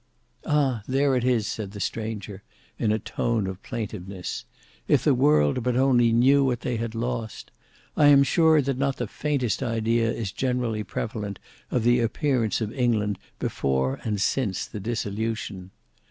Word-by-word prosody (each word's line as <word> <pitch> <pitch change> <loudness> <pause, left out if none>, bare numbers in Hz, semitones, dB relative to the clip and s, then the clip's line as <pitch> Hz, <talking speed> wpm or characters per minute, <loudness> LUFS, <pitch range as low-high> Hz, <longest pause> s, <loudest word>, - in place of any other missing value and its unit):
"Ah! 135 -6 +2
there 135 +1 +2
it 125 - 0
is," 120 -4 +2
said 100 -1 -4
the 105 - -7
stranger, 105 -2 -4 0.4
in 110 - +2
a 110 - +2
tone 110 0 -1
of 95 0 -5
plaintiveness; 100 -4 -5 0.4
"if - - +3
the - - +4
world 75 - +3
but 125 +1 0
only 125 -3 +4
knew 135 +5 +5
what 125 -3 0
they 125 -2 -2
had 115 0 -4
lost! 115 -1 -4 0.4
I 145 - +5
am 140 -1 +7
sure 160 0 +4
that 135 -1 -2
not 135 -1 0
the 120 - -2
faintest 130 -1 -1
idea 115 -1 +1
is 110 -5 -3
generally 125 -4 -1
prevalent 105 -3 -4 0.3
of 125 - 0
the 120 +1 +4
appearance 120 -1 0
of 110 0 -3
England 110 -6 0 0.2
before 65 0 -1
and 105 -3 -1
since 100 -3 0
the 105 - -7
dissolution. 105 -3 -3
115 Hz, 160 wpm, -25 LUFS, 105-125 Hz, 0.4 s, am